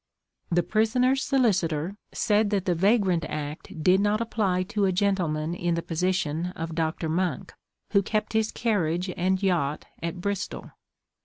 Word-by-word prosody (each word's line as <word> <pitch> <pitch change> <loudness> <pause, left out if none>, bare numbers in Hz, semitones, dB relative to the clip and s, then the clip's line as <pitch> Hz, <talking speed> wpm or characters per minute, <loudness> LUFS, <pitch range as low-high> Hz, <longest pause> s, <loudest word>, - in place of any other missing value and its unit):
The 175 0 +2
prisoner's 250 +6 +2
solicitor 185 - +1 0.2
said 210 0 +2
that 200 -3 0
the 180 - +2
Vagrant 190 -1 +2
Act 150 +2 -6
did 185 +3 +5
not 205 +1 +2
apply 210 -5 0
to 200 +2 0
a 190 - +2
gentleman 175 -5 0
in 175 -1 -1
the 170 - -2
position 170 -1 -1
of 165 0 -4
Dr. 160 0 -1
Monck, 165 -3 -1 0.4
who 200 -1 +4
kept 215 +3 -2
his 220 0 +1
carriage 180 -5 0
and 185 +2 0
yacht 165 -6 0 0.2
at 170 +2 -4
Bristol. 200 +1 -4
185 Hz, 150 wpm, -26 LUFS, 165-205 Hz, 0.4 s, did